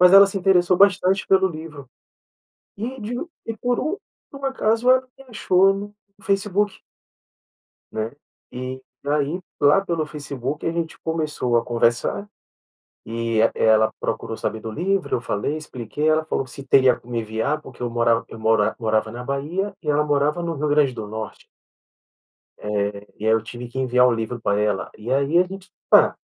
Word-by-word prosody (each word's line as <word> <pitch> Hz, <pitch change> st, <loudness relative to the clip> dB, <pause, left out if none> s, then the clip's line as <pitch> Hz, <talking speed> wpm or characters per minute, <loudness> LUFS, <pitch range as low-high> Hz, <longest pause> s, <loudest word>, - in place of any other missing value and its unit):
mas 180 Hz, +1 st, +7 dB
ela 200 Hz, 0 st, +10 dB
se 195 Hz, 0 st, -2 dB
interessou 180 Hz, -1 st, +3 dB
bastante 195 Hz, -1 st, +4 dB
pelo 190 Hz, 0 st, +4 dB
livro. 155 Hz, -4 st, -9 dB, 0.9 s
E 245 Hz, +5 st, -5 dB
de 220 Hz, +4 st, -4 dB, 0.3 s
e 225 Hz, -, -4 dB
por 245 Hz, +1 st, 0 dB
um 310 Hz, +8 st, -1 dB, 0.4 s
por 275 Hz, -, -10 dB
um 275 Hz, -, -3 dB
acaso 235 Hz, -2 st, +1 dB
ela 255 Hz, 0 st, +7 dB, 0.2 s
me 270 Hz, -, -13 dB
achou 195 Hz, -3 st, +3 dB
no 205 Hz, +1 st, -7 dB, 0.3 s
Facebook. 200 Hz, 0 st, 0 dB, 1.1 s
Né, 110 Hz, +1 st, -3 dB, 0.4 s
e 130 Hz, +1 st, -6 dB, 0.2 s
aí 150 Hz, +4 st, 0 dB, 0.2 s
lá 145 Hz, +6 st, +6 dB
pelo 165 Hz, -3 st, -1 dB
Facebook 145 Hz, -1 st, -5 dB
a 165 Hz, -, +1 dB
gente 165 Hz, -1 st, -4 dB
começou 155 Hz, -7 st, -1 dB
a -, -, +1 dB
conversar, 120 Hz, -, 0 dB, 0.8 s
e 115 Hz, 0 st, -1 dB, 0.2 s
ela 110 Hz, 0 st, +4 dB
procurou -, -, -3 dB
saber 110 Hz, -, -3 dB
do 110 Hz, -, -6 dB
livro 190 Hz, -, 0 dB
eu -, -, -4 dB
falei 125 Hz, +7 st, -2 dB
expliquei 150 Hz, 0 st, -3 dB
ela 155 Hz, 0 st, +3 dB
falou 155 Hz, -, -1 dB
que 130 Hz, -, -14 dB
se 140 Hz, -, -9 dB
teria 130 Hz, -1 st, +5 dB
como 120 Hz, 0 st, -10 dB
enviar 115 Hz, +6 st, -1 dB
porque 125 Hz, -, -13 dB
eu 120 Hz, -, -1 dB
morav 115 Hz, 0 st, +2 dB
eu -, -, -9 dB
mora 110 Hz, -1 st, +3 dB
eu -, -, -13 dB
morava 110 Hz, 0 st, +1 dB
na 120 Hz, +1 st, -6 dB
Bahia 155 Hz, +10 st, -2 dB
e 155 Hz, -, -8 dB
ela 150 Hz, 0 st, +3 dB
morava 150 Hz, +3 st, +1 dB
no 170 Hz, -1 st, -2 dB
Rio 150 Hz, -, -1 dB
Grande 145 Hz, -2 st, +3 dB
do 110 Hz, -3 st, -6 dB
Norte. 110 Hz, 0 st, -7 dB, 1.1 s
Eh, 105 Hz, 0 st, -3 dB, 0.4 s
e 110 Hz, -, -4 dB
aí 110 Hz, -, +5 dB
eu 115 Hz, -, +2 dB
tive 120 Hz, +2 st, -8 dB
que 125 Hz, -, -7 dB
enviar 125 Hz, -1 st, +4 dB
o 125 Hz, -, +3 dB
livro 115 Hz, +1 st, -4 dB
pra 100 Hz, -2 st, +1 dB
ela 105 Hz, -2 st, 0 dB
e 120 Hz, +4 st, -4 dB
aí 140 Hz, +4 st, +2 dB
a -, -, +7 dB
gente 195 Hz, +1 st, -10 dB, 0.2 s
pa -, -, +6 dB
145 Hz, 185 wpm, -22 LUFS, 115-185 Hz, 1.1 s, ela